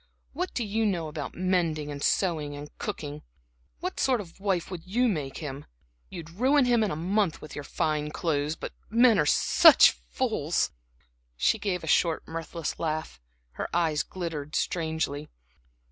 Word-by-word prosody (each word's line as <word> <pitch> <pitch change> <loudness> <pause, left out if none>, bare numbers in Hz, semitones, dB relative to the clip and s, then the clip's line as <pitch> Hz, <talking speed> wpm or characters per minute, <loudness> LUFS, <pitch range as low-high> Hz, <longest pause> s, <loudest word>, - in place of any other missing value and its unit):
What 360 +6 -2
do 240 - 0
you 220 +1 -1
know 170 -5 -1
about 150 -1 -6
mending 170 -5 0
and 140 -1 -6
sewing 155 -6 0
and 145 +1 -9
cooking? 150 -9 -5 0.6
What - - -4
sort 260 -3 +2
of 185 -4 -10
a - - -21
wife 190 -3 0
would 175 -3 -6
you 240 +7 +1
make 150 - -2
him? 145 -3 -6 0.4
You'd 165 -1 -8
ruin 260 - +3
him 240 -2 +3
in 210 - +1
a 150 - -2
month 185 +2 0
with 155 - -10
your 145 - -5
fine 150 +1 -1
clothes. 150 -1 -1
But - - -7 0.2
men 230 0 +5
are 150 - +2
such - - +7
fools!" - - -1 0.7
She - - +2
gave 180 -4 -2
a - - -6
short 165 +1 +2
mirthless 165 0 -5
laugh, 155 - -3 0.3
her - - -5
eyes 160 -3 +2
glittered 160 -5 -5
strangely. 160 -3 -1
165 Hz, 165 wpm, -27 LUFS, 150-195 Hz, 0.7 s, such